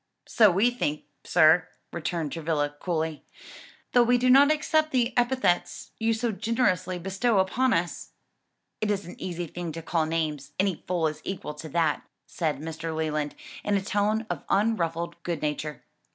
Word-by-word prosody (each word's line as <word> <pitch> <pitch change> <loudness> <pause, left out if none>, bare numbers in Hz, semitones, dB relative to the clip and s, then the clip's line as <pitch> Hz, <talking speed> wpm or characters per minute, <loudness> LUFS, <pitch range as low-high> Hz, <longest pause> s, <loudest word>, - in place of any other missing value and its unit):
"So 215 -3 +5
we 200 +7 +3
think, 155 -11 -2 0.2
sir," 160 0 +5 0.3
returned 165 -2 -2
Travilla 150 -3 -1
coolly, 160 -3 -2 0.7
"though 245 - +5
we 245 +1 +4
do 250 +1 +3
not 280 +3 +7
accept 310 0 +2
the 245 -1 +1
epithets 245 -7 +1
you 225 0 +2
so 230 +1 -1
generously 205 -5 0
bestow 195 +5 0
upon 230 +7 +2
us." 170 0 -1 0.7
"It 215 - -1
is 200 -3 -1
an 175 - -8
easy 175 -1 -3
thing 170 +1 -5
to 165 +1 -7
call 165 -1 0
names; 155 -3 -2
any 190 -3 0
fool 175 -3 0
is 155 -1 -2
equal 185 -5 -5
to 155 +1 -9
that," 160 -1 +1 0.2
said 155 -5 -2
Mr. 160 +2 -5
Leland, 155 -2 -2 0.3
in 205 -1 +1
a - - -1
tone 210 +2 0
of - - -4
unruffled 170 -5 0
good 170 -3 -3
nature. 150 -2 -3
175 Hz, 165 wpm, -27 LUFS, 160-220 Hz, 0.7 s, not